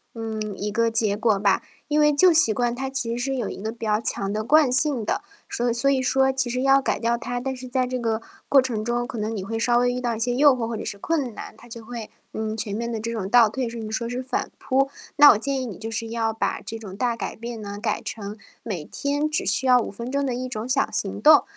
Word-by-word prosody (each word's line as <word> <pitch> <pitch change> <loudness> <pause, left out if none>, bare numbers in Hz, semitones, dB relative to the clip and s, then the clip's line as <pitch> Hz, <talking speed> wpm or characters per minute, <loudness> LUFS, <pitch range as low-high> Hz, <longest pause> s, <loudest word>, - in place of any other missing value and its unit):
嗯， 220 -3 -4
一 210 +1 -3
个 230 +2 +2
结 220 -3 +1
果 220 -1 +2
吧。 195 -1 +2 0.3
因 300 - +2
为 300 0 +5
旧 345 +5 +5
习 310 -9 +4
惯 240 +1 0
它 265 +2 -3
其 240 -3 -2
实 270 +3 -1
有 240 -5 -2
一 - - -7
个 220 +2 -3
比 230 0 -7
较 215 0 +1
强 195 -3 -2
的 215 0 -1
惯 300 +2 +5
性 260 -3 +1
的， - - -1 0.3
说 240 - -2
所 - - +3
以 235 - +1
所 260 +4 +2
以 265 -1 +2
说 265 +1 +3
其 265 -2 -1
实 250 +2 -1
要 275 0 +5
改 - - 0
掉 235 0 +1
它， 245 +1 -4
但 265 +1 -3
是 255 0 -8
在 255 0 0
这 255 0 -3
个 225 -1 -1 0.3
过 275 - +7
程 240 -5 -1
中， 240 +1 -1
可 245 -2 -6
能 215 +1 -2
你 190 - -4
会 225 +3 -3
稍 240 +1 +3
微 245 0 +2
遇 250 - -3
到 235 -2 -1
一 - - -6
些 245 +2 0
诱 280 +1 +6
惑 230 -2 -2
或 230 - -3
者 220 - -5
是 200 - -5
困 265 -1 -1
难， - - -8
它 240 - -16
就 230 -1 -9
会， 235 -2 -7 0.2
嗯， 220 0 -3
全 210 -2 -3
面 235 +2 -3
的 225 - -3
这 230 +2 -3
种 210 -5 -3
倒 235 0 +7
退， 245 +3 -3
甚 230 -1 -6
至 215 - -6
说 235 +1 -2
是 250 +1 -3
反 255 - -2
扑。 270 +1 +1 0.3
那 290 0 +10
我 210 - +3
建 275 +3 -1
议 255 - -3
你 195 - -7
就 225 +1 -6
是 225 +1 -3
要 225 -1 -1
把 225 - -2
这 225 - -7
种 195 -3 -9
大 240 0 0
改 - - -5
变 230 0 -7
呢， 205 -1 -6
改 215 -1 -1
成 210 0 -6 0.3
每 190 -9 -4
天 290 - -1
只 305 - -1
需 265 - 0
要 250 -1 +7
5 230 - -3
分 235 +5 -6
钟 280 0 0
的 260 - -1
一 255 +1 -4
种 225 -2 -4
小 270 +2 +1
行 100 +1 -3
动。 - - +8
235 Hz, 300 characters per minute, -24 LUFS, 220-260 Hz, 0.3 s, 那